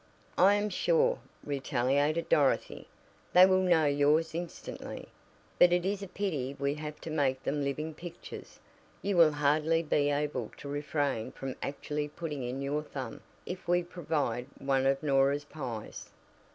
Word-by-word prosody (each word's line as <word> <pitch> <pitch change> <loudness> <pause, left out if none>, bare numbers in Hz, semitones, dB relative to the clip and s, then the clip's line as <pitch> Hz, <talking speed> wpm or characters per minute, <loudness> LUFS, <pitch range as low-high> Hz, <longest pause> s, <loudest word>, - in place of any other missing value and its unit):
"I 195 +2 +7
am 205 0 0
sure," - - +2 0.3
retaliated 145 +3 0
Dorothy, 140 -3 +1 0.5
"they 180 +1 +9
will 185 0 +4
know 175 -4 +4
yours 145 +3 +3
instantly. 170 0 -6 0.5
But 175 - +7
it 175 0 +2
is 200 +1 -1
a 195 - -5
pity 150 -10 -3
we 140 0 0
have 150 0 -7
to 160 - -6
make 140 -4 0
them 145 0 -1
living 150 +3 -3
pictures. 170 +2 -10 0.4
You 200 -1 0
will 165 -3 +6
hardly 150 +3 +2
be 145 -2 +2
able 145 -5 -1
to - - -9
refrain 145 -4 -1
from 135 -1 -5
actually 150 +1 -3
putting 150 -2 -5
in 125 +2 -3
your 145 +2 -1
thumb 140 -3 -7 0.2
if 180 -1 -7
we 175 0 +3
provide 150 -8 -2
one 135 -1 +1
of 135 +1 +1
Norah's 140 0 +2
pies." 125 -8 -7
150 Hz, 150 wpm, -30 LUFS, 140-170 Hz, 0.5 s, they